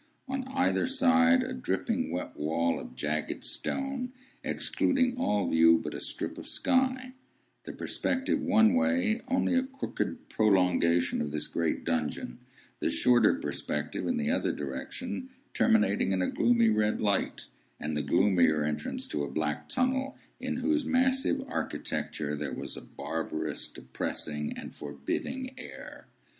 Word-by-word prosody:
On 265 Hz, 0 st, -2 dB
either 265 Hz, 0 st, +1 dB
side, 260 Hz, -1 st, +4 dB
a 255 Hz, 0 st, -4 dB
dripping 250 Hz, 0 st, -1 dB
wet -, -, -4 dB
wall 80 Hz, +3 st, 0 dB
of -, -, -10 dB
jagged 75 Hz, +3 st, -2 dB
stone, 270 Hz, -2 st, -2 dB, 0.3 s
excluding 255 Hz, -2 st, +1 dB
all 105 Hz, -, +1 dB
view 80 Hz, 0 st, +6 dB
but -, -, -5 dB
a -, -, -5 dB
strip -, -, -2 dB
of -, -, -9 dB
sky; 260 Hz, 0 st, +1 dB, 0.5 s
the -, -, -5 dB
perspective 265 Hz, 0 st, -1 dB
one 220 Hz, +2 st, +5 dB
way 255 Hz, -3 st, +2 dB
only 265 Hz, 0 st, +1 dB
a 260 Hz, -, +4 dB
crooked 270 Hz, +1 st, -4 dB
prolongation 90 Hz, -5 st, +3 dB
of 75 Hz, -, -2 dB
this 75 Hz, 0 st, -3 dB
great 85 Hz, -2 st, -1 dB
dungeon; 80 Hz, -7 st, -2 dB, 0.4 s
the -, -, 0 dB
shorter 125 Hz, -, +5 dB
perspective 295 Hz, -, -3 dB
in 255 Hz, -, +1 dB
the 230 Hz, 0 st, 0 dB
other 275 Hz, -, +1 dB
direction 260 Hz, 0 st, -5 dB, 0.2 s
terminating 225 Hz, -, +3 dB
in 95 Hz, -1 st, +1 dB
a -, -, +1 dB
gloomy 235 Hz, -1 st, +4 dB
red 105 Hz, -, +2 dB
light, 100 Hz, -1 st, 0 dB, 0.3 s
and 75 Hz, 0 st, -3 dB
the 75 Hz, -, 0 dB
gloomier 85 Hz, -1 st, +3 dB
entrance 75 Hz, 0 st, -2 dB
to 75 Hz, -, -2 dB
a 70 Hz, -, -3 dB
black 75 Hz, +1 st, -2 dB
tunnel, 265 Hz, +2 st, 0 dB, 0.2 s
in -, -, -2 dB
whose 310 Hz, -1 st, +1 dB
massive 265 Hz, +1 st, +1 dB
architecture 75 Hz, -, -3 dB
there 75 Hz, -2 st, -4 dB
was -, -, -5 dB
a -, -, -8 dB
barbarous, 80 Hz, +3 st, -4 dB
depressing, 75 Hz, +3 st, -4 dB
and -, -, -8 dB
forbidding 75 Hz, -, -4 dB
air. -, -, -10 dB
225 Hz, 145 wpm, -29 LUFS, -, 0.5 s, view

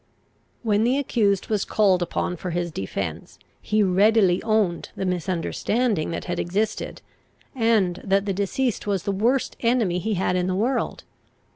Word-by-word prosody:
When 215 Hz, -1 st, +2 dB
the 250 Hz, +4 st, +2 dB
accused 210 Hz, -8 st, +1 dB
was 210 Hz, -3 st, 0 dB
called 195 Hz, -4 st, +2 dB
upon 175 Hz, +1 st, -2 dB
for 180 Hz, +1 st, -5 dB
his 175 Hz, 0 st, -2 dB
defence, 95 Hz, -10 st, -5 dB, 0.2 s
he 215 Hz, 0 st, +1 dB
readily 195 Hz, 0 st, +4 dB
owned 215 Hz, -6 st, 0 dB
the 190 Hz, -, -3 dB
misunderstanding 185 Hz, +3 st, -1 dB
that 165 Hz, -, -4 dB
had 175 Hz, -, -3 dB
existed, 205 Hz, +5 st, -2 dB, 0.5 s
and 225 Hz, -8 st, +1 dB
that 195 Hz, +1 st, +1 dB
the 200 Hz, -, -1 dB
deceased 210 Hz, +5 st, -1 dB
was 195 Hz, -3 st, 0 dB
the 200 Hz, -, -1 dB
worst 235 Hz, +7 st, +1 dB
enemy 230 Hz, -7 st, +1 dB
he 215 Hz, +3 st, -1 dB
had 180 Hz, 0 st, 0 dB
in 180 Hz, 0 st, 0 dB
the 185 Hz, -, 0 dB
world. 240 Hz, +6 st, -1 dB
200 Hz, 155 wpm, -24 LUFS, 180-220 Hz, 0.5 s, readily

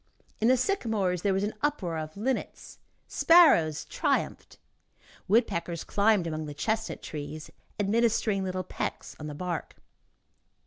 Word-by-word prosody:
In 220 Hz, -, +2 dB
the 255 Hz, +1 st, +5 dB
sycamores 220 Hz, -, 0 dB
there 200 Hz, -, +1 dB
was 195 Hz, +1 st, 0 dB
an 210 Hz, -, -2 dB
uproar 190 Hz, -, -1 dB
of 155 Hz, +3 st, -7 dB
linnets, 255 Hz, +5 st, -3 dB, 0.3 s
sparrows 225 Hz, -, +5 dB
triumphed, -, -, -2 dB, 0.7 s
woodpeckers 175 Hz, -6 st, +1 dB
climbed 205 Hz, -3 st, +2 dB
along 155 Hz, -1 st, -4 dB
the 145 Hz, -, -7 dB
chestnut 220 Hz, +7 st, -2 dB
trees, 150 Hz, 0 st, -7 dB, 0.3 s
administering 215 Hz, -1 st, +1 dB
little 185 Hz, 0 st, -2 dB
pecks -, -, -5 dB
on 150 Hz, -, -6 dB
the 150 Hz, -, -6 dB
bark. 175 Hz, +1 st, -4 dB
195 Hz, 130 wpm, -28 LUFS, 165-225 Hz, 0.7 s, the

